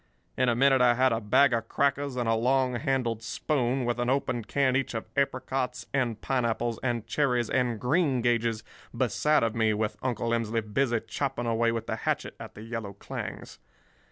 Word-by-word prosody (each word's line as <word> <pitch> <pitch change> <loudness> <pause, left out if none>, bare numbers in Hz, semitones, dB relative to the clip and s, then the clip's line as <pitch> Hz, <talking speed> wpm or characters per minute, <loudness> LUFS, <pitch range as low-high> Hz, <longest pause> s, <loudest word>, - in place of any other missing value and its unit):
In 130 -1 +2
a 120 - +2
minute 135 +1 +4
I 120 -1 +5
had 130 0 +3
a 115 - -1
bag 130 +5 +4
of 115 -1 -1
crackers 140 0 0
and 120 -2 -1
a 115 - +3
long 125 +3 +2
handled 120 -2 -1
spoon, 130 +1 -1
with 120 0 -1
an 120 0 0
open 130 -3 0
can 130 +4 +1
each 135 -3 -1
of 115 - -3
apricots 130 -2 -1
and 120 -6 0
pineapples 120 -3 -1
and 120 -3 -1
cherries 125 -2 0
and 125 -4 +1
greengages 120 - +1 0.3
beside 150 -3 +2
of 115 -1 0
me 110 -2 +2
with 105 0 -2
Uncle 120 -2 -1
Emsley 115 -1 0
busy 115 +2 0
chopping 135 -4 -3
away 115 0 +2
with 115 -1 -3
the - - -3
hatchet - - -2
at - - -9
the 105 - -9
yellow 115 -3 -5
clings. 100 - -7
120 Hz, 185 wpm, -28 LUFS, 115-130 Hz, 0.3 s, I